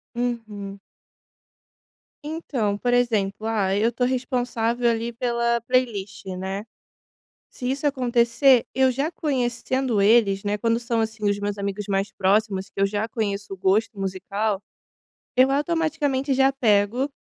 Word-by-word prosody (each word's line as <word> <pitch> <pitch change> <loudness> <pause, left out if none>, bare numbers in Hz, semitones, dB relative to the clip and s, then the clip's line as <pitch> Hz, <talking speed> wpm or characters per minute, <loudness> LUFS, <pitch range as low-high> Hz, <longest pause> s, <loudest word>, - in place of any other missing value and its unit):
Uhum. 215 -5 -4 1.5
Então, 260 -10 -2
por 245 +1 +1
exemplo, 220 -4 +1
ah, 195 -4 +1
eu 225 +3 +2
tô 245 +1 -1
responsável 245 -2 0
ali 230 +1 -1
pela 235 0 0
playlist, 225 -5 -1
né. 195 +2 -4 0.9
Se 250 -1 -5
isso 280 +2 -1
acontecer, 250 -1 +3
eu 260 -1 +4
já 280 +6 -1
conhecendo 255 -5 -1
eles, 200 -2 +4
né, 205 0 0
quando 230 +2 +1
são 235 -1 -1
assim 220 -1 -2
os 205 0 +1
meus 205 0 -3
amigos 200 0 -3
mais 195 +1 0
próximos 195 0 +1
que - - -10
eu 195 - +4
já 205 +2 -1
conheço 200 -3 -3
o - - -24
gosto 200 +2 +1
musical. 195 +2 -2 0.7
Eu 260 +1 +5
automaticamente 295 -3 0
já 270 +1 +4
pego 230 +1 +2
230 Hz, 135 wpm, -24 LUFS, 205-255 Hz, 1.5 s, Eu